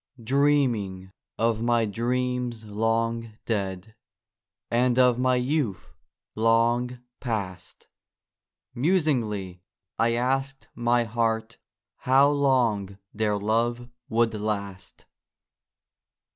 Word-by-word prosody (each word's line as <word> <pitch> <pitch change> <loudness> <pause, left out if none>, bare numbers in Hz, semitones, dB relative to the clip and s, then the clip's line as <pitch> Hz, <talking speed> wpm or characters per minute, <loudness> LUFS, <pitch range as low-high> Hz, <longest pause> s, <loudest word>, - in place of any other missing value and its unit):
Dreaming 120 -8 +1 0.3
of 115 -1 +1
my 120 -1 +2
dreams 120 +1 -2
long 115 +1 -1
dead, 100 -1 -3 0.8
And 120 +1 +2
of 125 -1 +4
my 130 0 +3
youth 125 -4 -1 0.4
long 120 +2 +1 0.2
past, 100 -7 -5 0.9
Musingly 120 - 0 0.4
I 115 +1 +3
asked 135 +3 -1
my 120 0 +2
heart 115 0 -2 0.4
How 135 +2 +4
long 120 -9 +1 0.2
their 105 -1 0
love 120 +4 -1 0.2
would 115 0 +2
last. 100 -3 -4
115 Hz, 85 wpm, -26 LUFS, 110-125 Hz, 0.9 s, of